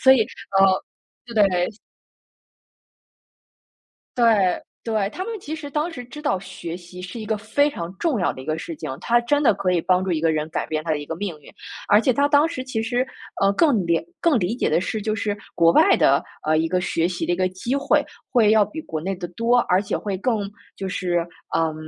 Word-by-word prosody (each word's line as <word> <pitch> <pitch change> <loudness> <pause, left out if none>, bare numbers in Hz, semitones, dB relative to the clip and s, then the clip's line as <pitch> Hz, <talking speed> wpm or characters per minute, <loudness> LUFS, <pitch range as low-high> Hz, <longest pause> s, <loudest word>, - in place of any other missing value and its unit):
所 265 0 +7
以， 260 - +4 0.4
呃， - - +8 0.7
对 185 -4 +3 2.5
对， 240 - +3 0.6
对。 215 -3 -1
他 365 - -5
们 455 -2 -5
其 310 -1 -5
实 305 -2 -7
当 300 +4 -1
时 250 - -7
知 295 +5 -10
道 290 -11 +1
学 180 -3 -7
习 180 +1 -10
是 185 +6 -7
一 215 - -6
个 220 - 0
非 220 +8 +1
常 170 -6 -6
重 310 -9 0
要 180 - +1
的 130 - -10
一 130 - -10
个 155 0 -1
事 165 0 -6
情。 - - -6
他 240 0 +3
真 290 +5 +1
的 255 - +5
可 190 -1 -1
以 180 - +2
帮 185 +1 +2
助 190 - -2
一 160 -2 0
个 165 -1 +3
人 155 0 -2
改 - - -2
变 155 0 -2
他 165 - -4
的 155 - +1
一 145 - -6
个 165 - -5
命 175 -5 -4
运。 - - -15 0.4
而 205 +1 +6
且 255 +3 +2
他 285 +2 +3
当 290 +2 +4
时 260 -6 -5
其 225 -4 -2
实， 245 +3 0 0.4
呃， 195 0 +4
更 230 - +2
理 170 - +2 0.2
更 320 -8 +3
理 195 +7 -1
解 - - 0
的 - - +3
是 210 +3 -3
就 215 0 -1
是 205 -1 -2 0.2
国 165 0 +5
外 - - +6
的， 140 +1 +4 0.2
呃， 155 0 +3
一 160 +1 +2
个 180 +2 0
学 170 -1 0
习 175 -1 -3
的 175 - +1
一 - - -6
个 185 0 +1
机 235 +9 -2
会， 285 +1 +2 0.3
会 225 -5 +5
要 215 -2 +5
比 315 +8 -7
国 160 - -4
内 195 +2 -2
的 175 -1 -6
多， 230 +7 +2
而 185 +2 +3
且 - - -2
会 200 -2 -3
更 205 -1 -1 0.3
就 195 - -4
是， 180 -2 0 0.4
嗯， 160 -1 +1
200 Hz, 245 characters per minute, -23 LUFS, 175-245 Hz, 2.5 s, 呃